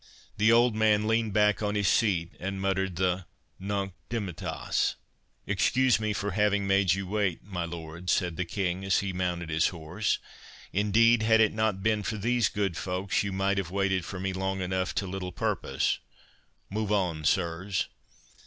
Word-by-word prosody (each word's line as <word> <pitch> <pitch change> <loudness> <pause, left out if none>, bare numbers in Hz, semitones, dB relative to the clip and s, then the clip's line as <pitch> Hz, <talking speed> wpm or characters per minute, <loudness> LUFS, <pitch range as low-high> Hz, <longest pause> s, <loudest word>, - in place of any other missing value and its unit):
The 110 +2 +4
old 120 0 +5
man 110 -1 +3
leaned 115 -1 +1
back 105 +1 +3
on 105 0 -1
his 100 -2 +1
seat, 90 -7 +2
and 95 +1 -4
muttered 95 -1 0
the 90 0 0 0.3
Nunc 100 -1 -2 0.2
dimittas. 100 -8 -2 0.5
"Excuse 130 -3 +3
me 110 -1 -1
for 105 0 -2
having 105 +1 +2
made 95 -2 +3
you 100 0 -4
wait, 100 -3 -1
my 95 -4 -4
lords," 85 +1 -5
said 90 -2 +1
the 90 - -1
King, 90 0 -2
as 95 -1 +2
he 100 -1 -3
mounted 90 -2 -2
his 80 +1 +3
horse; 90 +5 -2 0.6
"indeed, 110 +3 +4
had 110 0 +4
it 110 -1 +4
not 110 -3 0
been 110 -1 +2
for 110 +2 -3
these 120 +2 +2
good 100 -4 -1
folks, 95 +1 -1
you 100 - -2
might 100 +1 +1
have 90 -3 -3
waited 95 -1 0
for 90 +2 -6
me 95 0 -2
long 95 +1 -2
enough 95 0 -2
to 100 - 0
little 90 -1 -4
purpose.—Move 85 +6 -4
on, 90 -7 0
sirs." 90 +4 0
95 Hz, 170 wpm, -28 LUFS, 90-105 Hz, 0.6 s, old